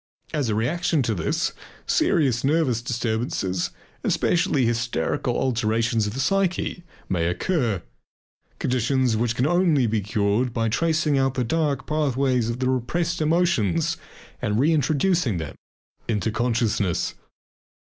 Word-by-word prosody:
As 145 Hz, -6 st, 0 dB
a 105 Hz, -, +1 dB
reaction 155 Hz, +6 st, +1 dB
to 115 Hz, -, 0 dB
this 160 Hz, +10 st, -1 dB, 0.3 s
serious 150 Hz, -, +2 dB
nervous 140 Hz, -5 st, +2 dB
disturbances, 110 Hz, -6 st, -1 dB, 0.3 s
especially 145 Hz, -6 st, +2 dB
hysterical 115 Hz, -8 st, -1 dB
alterations 115 Hz, -3 st, +1 dB
of 105 Hz, -, -5 dB
the -, -, -4 dB
psyche, 185 Hz, +3 st, 0 dB, 0.3 s
may 85 Hz, -3 st, 0 dB
occur, 110 Hz, -, 0 dB, 0.7 s
conditions 130 Hz, -1 st, +1 dB
which 120 Hz, +2 st, 0 dB
can 125 Hz, -, +1 dB, 0.4 s
be 110 Hz, -1 st, 0 dB
cured 100 Hz, 0 st, 0 dB
only -, -, -5 dB
by 115 Hz, -1 st, -1 dB
tracing 155 Hz, +2 st, +1 dB
out 135 Hz, -1 st, +1 dB
the 125 Hz, -, +1 dB
dark 145 Hz, +1 st, 0 dB
pathways 135 Hz, -5 st, +1 dB
of 115 Hz, -, -2 dB
the 130 Hz, 0 st, -1 dB
repressed 160 Hz, +7 st, -1 dB
emotions 155 Hz, -, +1 dB, 0.4 s
and 105 Hz, +1 st, 0 dB
reintroducing 155 Hz, -, +2 dB
them 80 Hz, -3 st, -5 dB, 0.5 s
into 110 Hz, -2 st, 0 dB
consciousness. 115 Hz, -6 st, 0 dB
125 Hz, 125 wpm, -24 LUFS, 110-150 Hz, 0.7 s, serious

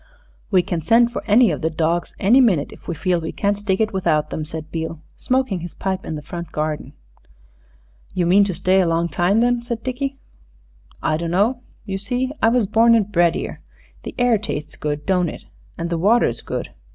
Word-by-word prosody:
"We 185 Hz, -4 st, +3 dB
can 170 Hz, -2 st, -3 dB
send 235 Hz, +8 st, +4 dB
for -, -, -4 dB
any 220 Hz, 0 st, +5 dB
of 150 Hz, -, -4 dB
the 160 Hz, -, +1 dB
dawgs 165 Hz, +2 st, -1 dB
any 240 Hz, +8 st, +5 dB
minute 185 Hz, -, +2 dB
if -, -, -15 dB
we 170 Hz, -, -3 dB
feel 180 Hz, +1 st, 0 dB
we 160 Hz, -, -4 dB
can't 205 Hz, 0 st, 0 dB
stick 200 Hz, -2 st, -1 dB
it 220 Hz, -1 st, 0 dB
without 155 Hz, -5 st, 0 dB
'em," 155 Hz, -, -3 dB
said 160 Hz, 0 st, -7 dB
Beale, 160 Hz, -1 st, -4 dB, 0.2 s
smoking 255 Hz, -7 st, 0 dB
his 170 Hz, 0 st, -8 dB
pipe 190 Hz, -1 st, -3 dB
in 155 Hz, -, -4 dB
the 150 Hz, -, -7 dB
front 170 Hz, +2 st, -7 dB
garden. 155 Hz, 0 st, -3 dB, 1.2 s
"You 180 Hz, -, +1 dB
mean 190 Hz, +4 st, +5 dB
to 190 Hz, -3 st, -3 dB
stay 185 Hz, +2 st, +3 dB
a 180 Hz, -, +1 dB
long 165 Hz, +1 st, +1 dB
time, 190 Hz, +7 st, +2 dB
then," 245 Hz, 0 st, +2 dB
said 235 Hz, -2 st, -5 dB
Dickie. 270 Hz, +2 st, -3 dB, 0.9 s
"I 155 Hz, -, +1 dB
dunno. 195 Hz, +9 st, 0 dB, 0.2 s
You 195 Hz, -2 st, -3 dB
see, 250 Hz, +6 st, -2 dB
I 225 Hz, -, +5 dB
was 240 Hz, -2 st, +2 dB
born 230 Hz, +4 st, +4 dB
and 210 Hz, -2 st, +1 dB
bred 170 Hz, -3 st, +3 dB
'ere. -, -, -6 dB, 0.4 s
The -, -, -8 dB
air 245 Hz, -3 st, +3 dB
tastes 150 Hz, -8 st, -5 dB
good, 150 Hz, 0 st, -4 dB
don't 180 Hz, -3 st, +1 dB
it? -, -, -9 dB, 0.3 s
An' 170 Hz, 0 st, -3 dB
the 170 Hz, -1 st, -1 dB
water's 220 Hz, +7 st, +3 dB
good. -, -, -5 dB
190 Hz, 205 wpm, -21 LUFS, 165-225 Hz, 1.2 s, any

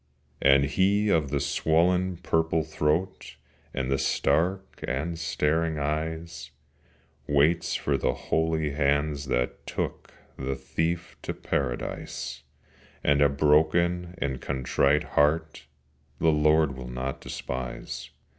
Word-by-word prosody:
And 70 Hz, 0 st, +5 dB
he 100 Hz, +7 st, +2 dB
of 80 Hz, -7 st, +2 dB
the 70 Hz, 0 st, 0 dB
swollen 85 Hz, +6 st, +2 dB
purple 80 Hz, -2 st, +1 dB
throat, 75 Hz, +3 st, -1 dB, 0.4 s
And 65 Hz, -1 st, -2 dB
the 70 Hz, -, +2 dB
stark 85 Hz, +8 st, 0 dB
and 80 Hz, +6 st, -2 dB
staring 80 Hz, 0 st, 0 dB
eyes, 80 Hz, +1 st, -3 dB, 0.8 s
Waits 75 Hz, +4 st, +2 dB
for -, -, 0 dB
the 65 Hz, -, +1 dB
holy 80 Hz, -2 st, 0 dB
hands 70 Hz, 0 st, +1 dB
that 60 Hz, -2 st, -2 dB
took -, -, -4 dB, 0.3 s
The 65 Hz, 0 st, -2 dB
Thief 80 Hz, +6 st, -2 dB
to -, -, -4 dB
Paradise; 60 Hz, -4 st, -3 dB, 0.6 s
And 70 Hz, 0 st, +3 dB
a 70 Hz, -, +6 dB
broken 80 Hz, +5 st, +2 dB
and 65 Hz, -2 st, -2 dB
a -, -, -13 dB
contrite 70 Hz, +2 st, +1 dB
heart 75 Hz, 0 st, +1 dB, 0.5 s
The 80 Hz, -, +3 dB
Lord 75 Hz, -1 st, +3 dB
will 65 Hz, -1 st, -7 dB
not 65 Hz, +2 st, -4 dB
despise. 65 Hz, 0 st, -5 dB
75 Hz, 120 wpm, -27 LUFS, 70-80 Hz, 0.8 s, a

